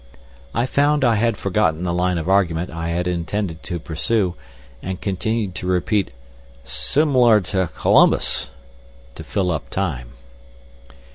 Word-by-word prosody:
I 115 - +2
found 145 +2 +2
I 120 - +4
had 115 0 +1
forgotten 90 -4 0
the 85 -1 -1
line 90 0 +1
of 80 0 -4
argument 90 -3 +1
I 85 0 -4
had 85 +1 -1
intended 90 0 -3
to 90 -2 -4
pursue, 90 +4 -1 0.5
and 95 0 -5
continued 105 +1 -2
to 90 - -5
repeat 95 +2 +1 0.5
"sim'lar 125 - +3
to 95 -3 +1
C'lumbus," - - +2 0.6
to - - -9
fill 90 -2 -1
up 80 - -4
time. 65 -11 -3
95 Hz, 135 wpm, -21 LUFS, 85-110 Hz, 0.6 s, I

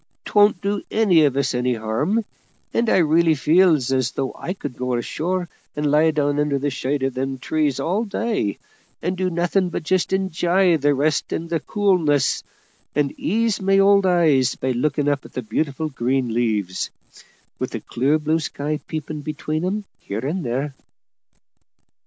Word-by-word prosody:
'Twon't 205 -2 +4
do 200 0 -1
any 185 -8 +4
of 140 -2 0
us 140 -1 +1
any 125 0 0
harm; 145 - -1 0.5
and 230 -1 +1
I - - +4
really 165 -1 +4
feels 155 -3 +3
as 130 -1 +1
though 135 0 -3
I 180 - -4
could 145 -9 -7
go 125 0 -2
ashore 175 +9 -2 0.3
and 150 -1 0
lie 155 +2 +4
down 145 -2 0
under 150 -1 +1
the 140 +1 -1
shade 135 +1 -2
of 135 -1 0
them 135 +1 -3
trees 150 0 0
all 190 +7 0
day, 210 - -1 0.5
and 180 +2 -1
do 185 0 0
nothing 175 +2 +1
but 170 - -4
just 180 +2 +1
enj'y 185 -2 +2
the 145 0 +3
rest 150 +2 0
and 165 +1 -4
the 165 - +1
coolness, 165 - +1 0.5
and 145 -1 +1
ease 225 +1 0
my 195 0 +3
old 200 0 +5
eyes 155 -8 +3
by 130 - -2
looking 145 +3 0
up 145 -1 0
at - - -14
the 125 - -4
beautiful 140 +7 -2
green 125 -2 -1
leaves, 105 -6 -1 0.7
with - - -2
the - - -5
clear 135 +6 +1
blue 155 +1 0
sky 150 0 -3
peeping 155 -1 -5
between 155 +1 -3
'em 200 +3 -2
here 110 +5 -5
and 170 +6 -2
there." 135 +4 -2
150 Hz, 170 wpm, -22 LUFS, 135-180 Hz, 0.7 s, old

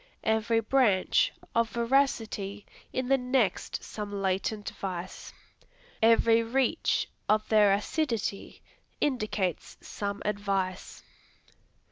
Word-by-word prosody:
Every 220 +1 +2
branch 240 - +3 0.2
of 230 -1 +2
veracity 230 -5 0 0.3
in 255 -1 -2
the 270 +1 +3
next 250 -6 0
some 210 -1 -6
latent 195 +1 -2
vice. 185 -2 -6 0.7
Every 230 0 +5
reach 260 +6 0 0.2
of 215 0 +2
their 210 -2 +5
ascidity 215 -1 -2 0.4
indicates 215 - -1
some 200 0 -5
advice. 195 -2 -2
215 Hz, 90 wpm, -28 LUFS, 200-235 Hz, 0.7 s, Every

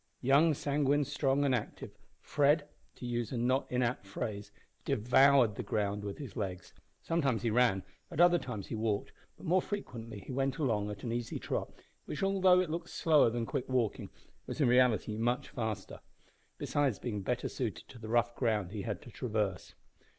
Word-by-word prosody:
Young, 145 +5 +4
sanguine, 145 0 +1
strong, 140 0 +1
and 135 - +2
active, 120 -4 -3 0.3
Fred, 145 +1 +2 0.3
to - - -8
use 120 -1 -2
a 125 - -2
not 130 +3 +1
inapt 125 -2 0
phrase, 100 +1 -5 0.3
devoured 130 -1 +4
the - - -5
ground 105 -1 -1
with 100 -1 -5
his 140 - -8
legs! 95 -5 -5 0.3
Sometimes 135 -10 0
he 115 - +1
ran, 115 -5 +3 0.3
at - - -6
other 175 0 +6
times 110 -9 -6
he - - -7
walked, 110 -2 -1 0.3
but - - -12
more 180 +2 +3
frequently 115 - -6
he - - -9
went 135 +1 0
along 110 -9 0
at 105 - -7
an 120 - -2
easy 120 0 -3
trot, - - -3 0.3
which, 150 - -4
although 190 -2 +5
it 175 -4 -3
looked 170 +1 -4
slower 155 -7 +4
than 115 0 -2
quick 125 - -3
walking, 125 -5 0 0.4
was - - -5
in 140 - +4
reality 120 -3 +3
much 120 +5 0
faster, 110 -4 -4 0.6
besides 140 -6 0
being 105 -5 -4
better 125 +5 -1
suited 115 -6 -4
to 125 - -13
the 110 -1 -8
rough 120 0 +2
ground 110 -7 0
he 105 -1 -4
had 100 -2 -4
to 120 - -12
traverse. 105 -7 -2
125 Hz, 180 wpm, -32 LUFS, 110-140 Hz, 0.6 s, other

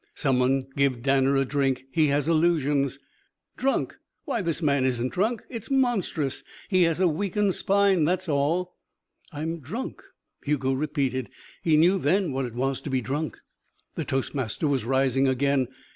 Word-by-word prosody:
"Some 135 -4 +1
one 130 +1 +2
give 135 -4 +1
Danner 135 0 +3
a 135 0 +2
drink. 135 -1 0
He 155 0 +3
has 145 +1 +1
illusions." 150 -5 +2 0.6
"Drunk! 270 +2 -1 0.3
Why, 265 -7 -1
this 170 -4 -1
man 140 -5 +2
isn't 125 -1 0
drunk. 220 +4 0
It's 230 -4 -7
monstrous. 235 - 0 0.3
He 185 -3 +3
has 165 +1 -2
a 185 - +4
weakened 195 +4 0
spine, 200 -3 +2
that's 180 +4 0
all." 160 +5 0 0.6
"I'm 160 +2 -4
drunk," 215 - -6 0.4
Hugo 135 -2 0
repeated. 135 -3 -1 0.3
He 160 -2 +3
knew 180 +5 +4
then 180 +2 +1
what 135 0 -1
it 120 -2 -7
was 135 +2 -1
to - - -6
be 130 -1 0
drunk. 145 +6 -3 0.6
The - - -3
toastmaster 135 +1 -2
was 135 -5 0
rising 135 +1 +2
again. 135 0 +1
145 Hz, 160 wpm, -26 LUFS, 135-175 Hz, 0.6 s, a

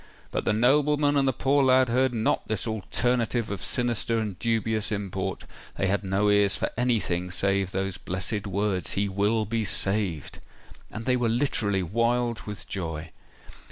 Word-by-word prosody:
But - - -2
the - - +2
nobleman 145 +5 +3
and 140 -1 +2
the - - +4
poor 140 +2 +2
lad 130 0 +4
heard 130 +2 +2
not 115 -2 0
this 110 - -2
alternative 115 +1 -1
of 100 -3 -5
sinister 120 -2 +1
and 105 -5 -3
dubious 110 -2 0
import: 100 -3 -3 0.3
they - - -1
had 100 +2 0
no 100 +2 +1
ears 105 -1 +3
for - - -2
anything 100 -7 0
save 95 +1 +1
those 95 -1 -2
blessed 95 +3 -3
words—"He 100 0 0
will 105 +3 0
be 115 +1 -1
saved!" 95 -5 -1 0.5
And 110 +1 -7
they 125 - +3
were 120 -2 +1
literally 110 -6 +1
wild 115 +5 0
with 105 -2 -7
joy. 80 -3 -5
110 Hz, 155 wpm, -26 LUFS, 95-120 Hz, 0.5 s, the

